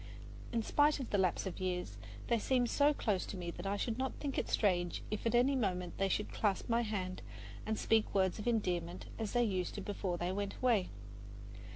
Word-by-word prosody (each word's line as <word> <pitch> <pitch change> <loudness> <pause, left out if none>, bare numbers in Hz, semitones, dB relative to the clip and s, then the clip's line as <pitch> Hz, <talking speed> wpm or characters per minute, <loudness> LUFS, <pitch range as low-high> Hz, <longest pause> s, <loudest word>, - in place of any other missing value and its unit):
In 230 -1 0
spite 295 +4 +3
of 260 - -5
the 205 - +2
lapse 185 0 +1
of 190 - -4
years, 180 -1 -2 0.3
they 235 -1 +2
seem 250 +2 +2
so 285 +4 +4
close 210 -10 0
to 195 - -5
me 175 -1 -4
that 175 +3 -6
I 200 +1 0
should 230 +3 -2
not 265 0 -1
think 280 -2 -2
it - - -3
strange 175 -4 +1
if 215 +2 -1
at 230 - +2
any 260 +3 +4
moment 180 -7 -1
they 195 0 +2
should 210 - -1
clasp 205 -3 0
my 235 0 +2
hand 190 -5 -3 0.5
and 220 0 0
speak 220 -2 +2
words 190 +1 +2
of 210 - -4
endearment 180 -6 0
as 220 -2 -3
they 240 0 +4
used 185 -5 -1
to 205 - -4
before 190 -3 -2
they 175 +1 -1
went 200 +1 -2
away. 230 -7 +2
205 Hz, 215 wpm, -35 LUFS, 185-235 Hz, 0.5 s, so